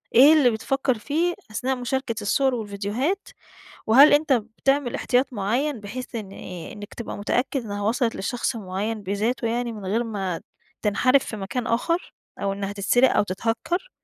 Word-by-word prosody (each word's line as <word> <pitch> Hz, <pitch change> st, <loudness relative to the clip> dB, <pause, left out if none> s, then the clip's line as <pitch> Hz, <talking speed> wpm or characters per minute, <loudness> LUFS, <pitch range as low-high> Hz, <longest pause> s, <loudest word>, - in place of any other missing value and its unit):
إيه 275 Hz, +6 st, +9 dB
اللي 295 Hz, -6 st, +5 dB
بتفكّر 255 Hz, +3 st, 0 dB
فيه 320 Hz, +10 st, 0 dB, 0.2 s
أثناء 255 Hz, +5 st, -1 dB
مشاركة 250 Hz, -1 st, -2 dB
الصور 260 Hz, +5 st, +2 dB
والفيديوهات؟ 220 Hz, -, -2 dB, 0.6 s
وهل 270 Hz, +7 st, +8 dB
أنت 295 Hz, 0 st, +4 dB
بتعمل 245 Hz, +3 st, 0 dB
احتياط 255 Hz, +1 st, +1 dB
معيّن 240 Hz, +6 st, -1 dB
بحيث 245 Hz, +5 st, -7 dB
إن 215 Hz, -4 st, -5 dB
إيه، 175 Hz, -3 st, -8 dB
إنّك 205 Hz, -1 st, -10 dB
تبقى 235 Hz, -, -6 dB
متأكد 245 Hz, +5 st, -1 dB
إنّها 205 Hz, -1 st, -4 dB
وصَلت 230 Hz, +2 st, +1 dB
لشخص 240 Hz, +4 st, -2 dB
معيّن 210 Hz, +2 st, -3 dB
بذاته 215 Hz, +6 st, -1 dB
يعني 240 Hz, +1 st, -1 dB
من 210 Hz, -3 st, -8 dB
غير 225 Hz, +5 st, 0 dB
ما 195 Hz, -6 st, -3 dB, 0.4 s
تنحَرِف 255 Hz, +6 st, +3 dB
في 220 Hz, -, -6 dB
مكان 210 Hz, +5 st, -3 dB
آخر 335 Hz, +10 st, -1 dB, 0.3 s
أو 195 Hz, -, 0 dB
إنّها 200 Hz, 0 st, -4 dB
تتسرق 245 Hz, +6 st, +3 dB
أو -, -, +5 dB
تتهكّر؟ 225 Hz, -, -2 dB
230 Hz, 160 wpm, -24 LUFS, 205-265 Hz, 0.6 s, إيه